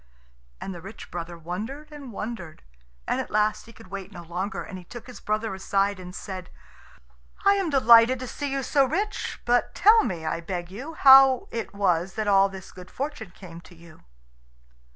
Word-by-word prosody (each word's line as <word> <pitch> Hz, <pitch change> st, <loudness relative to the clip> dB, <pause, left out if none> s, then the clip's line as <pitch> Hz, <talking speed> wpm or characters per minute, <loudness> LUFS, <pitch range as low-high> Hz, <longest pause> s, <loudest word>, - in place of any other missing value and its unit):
And 195 Hz, -, -6 dB
the 175 Hz, -, -9 dB
rich 200 Hz, +4 st, -11 dB
brother 170 Hz, 0 st, -6 dB
wondered 220 Hz, -, -6 dB
and 285 Hz, -4 st, -9 dB
wondered, 205 Hz, -6 st, -7 dB, 0.4 s
and -, -, 0 dB
at -, -, -8 dB
last 215 Hz, +1 st, 0 dB
he -, -, -12 dB
could 185 Hz, -3 st, -16 dB
wait 195 Hz, 0 st, -7 dB
no 175 Hz, -3 st, -10 dB
longer, 185 Hz, +4 st, -4 dB
and 190 Hz, -3 st, -8 dB
he -, -, -12 dB
took 240 Hz, +6 st, -10 dB
his 250 Hz, -, -11 dB
brother 215 Hz, 0 st, -2 dB
aside 195 Hz, +1 st, 0 dB
and 180 Hz, 0 st, -9 dB
said, 185 Hz, -2 st, -7 dB, 1.0 s
"I 400 Hz, -, +7 dB
am 390 Hz, -4 st, 0 dB
delighted 240 Hz, -3 st, +6 dB
to 255 Hz, -, -5 dB
see 285 Hz, +2 st, -4 dB
you 275 Hz, 0 st, -1 dB
so 275 Hz, +2 st, +3 dB
rich. 410 Hz, +11 st, -2 dB
But 245 Hz, 0 st, +1 dB
tell 440 Hz, +2 st, +6 dB
me, 170 Hz, -6 st, -4 dB
I 160 Hz, +1 st, -2 dB
beg 175 Hz, 0 st, -5 dB
you, 275 Hz, +11 st, -8 dB
how 270 Hz, -2 st, +7 dB
it 230 Hz, -3 st, -5 dB
was 185 Hz, -2 st, +1 dB
that 215 Hz, -1 st, -2 dB
all 195 Hz, -1 st, +5 dB
this 190 Hz, -1 st, -10 dB
good 180 Hz, 0 st, -12 dB
fortune 275 Hz, -7 st, -5 dB
came 170 Hz, -1 st, -12 dB
to 175 Hz, +2 st, -17 dB
you." 170 Hz, -1 st, -17 dB
200 Hz, 195 wpm, -25 LUFS, 180-255 Hz, 1.0 s, I